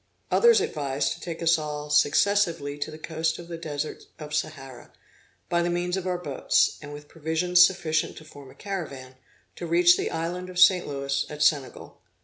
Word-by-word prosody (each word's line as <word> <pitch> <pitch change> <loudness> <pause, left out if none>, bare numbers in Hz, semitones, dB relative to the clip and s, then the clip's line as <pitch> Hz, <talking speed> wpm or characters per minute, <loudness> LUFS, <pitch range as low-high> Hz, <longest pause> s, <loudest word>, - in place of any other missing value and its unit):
Others 470 -3 +5
advised 140 -2 -2
to - - -13
take 170 -1 -6
us 165 0 +4
all 150 -1 -5
successively 155 0 +2
to 145 - -3
the 155 - -9
coast 160 +1 -2
of 170 - -10
the 170 - -6
desert 155 -2 -5
of 150 -1 -9
Sahara, 135 -4 -5 0.6
by 170 0 +1
the 175 - 0
means 175 +1 -1
of 190 -1 -4
our 180 -1 -1
boats, 150 -6 0
and 145 -1 -9
with 145 0 -10
provisions 165 +3 +3
sufficient 160 -4 0
to 155 - -12
form 145 -3 -13
a - - -16
caravan, 145 -10 -6 0.4
to 175 - -5
reach 175 +1 +5
the - - -2
island 175 +3 -4
of 180 - -9
Saint 180 0 +5
Louis, 140 -1 -2
at 150 0 -2
Senegal. 145 -4 -1
160 Hz, 185 wpm, -25 LUFS, 145-175 Hz, 0.6 s, Others